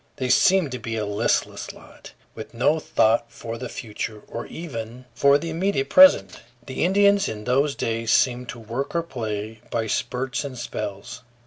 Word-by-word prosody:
They 130 Hz, -3 st, -3 dB
seemed 180 Hz, +3 st, +4 dB
to 125 Hz, -, -4 dB
be 115 Hz, 0 st, -4 dB
a 110 Hz, -1 st, -2 dB
listless 105 Hz, 0 st, -1 dB
lot, -, -, -15 dB, 0.2 s
with -, -, -10 dB
no 145 Hz, +7 st, +2 dB
thought 115 Hz, -4 st, +1 dB
for 115 Hz, 0 st, -7 dB
the 125 Hz, -, -5 dB
future, 105 Hz, -1 st, -6 dB
or -, -, -6 dB
even 125 Hz, -6 st, -7 dB
for 140 Hz, +2 st, +4 dB
the 165 Hz, +3 st, -5 dB
immediate 165 Hz, -4 st, -1 dB
present. 280 Hz, 0 st, +6 dB, 0.3 s
The 130 Hz, -, -3 dB
Indians 200 Hz, +2 st, +4 dB
in 105 Hz, -1 st, -6 dB
those 140 Hz, +4 st, +1 dB
days 115 Hz, 0 st, -2 dB
seemed 125 Hz, -1 st, +2 dB
to 120 Hz, -, -7 dB
work 120 Hz, +8 st, -5 dB
or 170 Hz, -, +1 dB
play 110 Hz, -6 st, -5 dB
by 115 Hz, -1 st, -1 dB
spurts 130 Hz, +5 st, -2 dB
and 135 Hz, -3 st, -7 dB
spells. 100 Hz, -4 st, -6 dB
125 Hz, 175 wpm, -23 LUFS, 115-145 Hz, 0.3 s, present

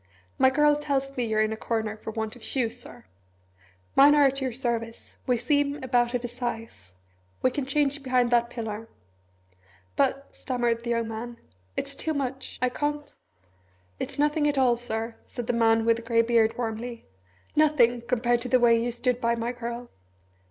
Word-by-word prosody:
"My 260 Hz, -, +6 dB
girl 295 Hz, +2 st, +4 dB
tells 275 Hz, -2 st, -2 dB
me 245 Hz, -, 0 dB
you're 215 Hz, -1 st, +2 dB
in 215 Hz, 0 st, -1 dB
a -, -, -3 dB
corner 220 Hz, -1 st, -2 dB
for 220 Hz, -, -8 dB
want 220 Hz, 0 st, -4 dB
of 245 Hz, -, -15 dB
shoes, 245 Hz, -2 st, -1 dB
Sir. -, -, -12 dB, 0.9 s
Mine 285 Hz, +2 st, +7 dB
are 290 Hz, -1 st, +6 dB
at 275 Hz, 0 st, +1 dB
your 260 Hz, -1 st, -1 dB
service 230 Hz, -2 st, -4 dB
we 250 Hz, -1 st, +3 dB
seem 285 Hz, +4 st, +1 dB
about 245 Hz, -1 st, +1 dB
of 245 Hz, -, -2 dB
a -, -, -2 dB
size 230 Hz, -, -6 dB, 0.5 s
we 255 Hz, -, +4 dB
can 265 Hz, 0 st, -3 dB
change 285 Hz, 0 st, +1 dB
behind 255 Hz, -2 st, +1 dB
that 235 Hz, 0 st, +3 dB
pillar." 225 Hz, -2 st, -6 dB, 1.1 s
"But," 275 Hz, 0 st, +1 dB
stammered 240 Hz, -3 st, -1 dB
the 240 Hz, -, -4 dB
young 230 Hz, -1 st, 0 dB
man, 230 Hz, +2 st, -6 dB, 0.4 s
"it's 280 Hz, 0 st, -1 dB
too 315 Hz, +2 st, -2 dB
much 265 Hz, -1 st, -4 dB
I 250 Hz, -, +3 dB
can't 295 Hz, +3 st, -3 dB, 0.4 s
" 95 Hz, 0 st, -37 dB
"It's -, -, -4 dB
nothing 295 Hz, +1 st, +2 dB
at 290 Hz, -1 st, 0 dB
all, 255 Hz, -3 st, +4 dB
Sir," 225 Hz, -1 st, -4 dB
said 245 Hz, -2 st, -6 dB
the 245 Hz, -, 0 dB
man 225 Hz, -1 st, +3 dB
with 230 Hz, 0 st, +4 dB
the -, -, -7 dB
grey 230 Hz, 0 st, +2 dB
beard 230 Hz, -1 st, +2 dB
warmly; 235 Hz, 0 st, -4 dB, 0.5 s
"nothing 255 Hz, -6 st, +4 dB
compared 240 Hz, 0 st, +1 dB
to 250 Hz, -, -4 dB
the 255 Hz, -, +4 dB
way 230 Hz, -1 st, +5 dB
you 240 Hz, -, -1 dB
stood 245 Hz, +1 st, -1 dB
by 235 Hz, 0 st, +2 dB
my 235 Hz, +1 st, -2 dB
girl! 240 Hz, 0 st, -6 dB
240 Hz, 185 wpm, -26 LUFS, 230-265 Hz, 1.1 s, Mine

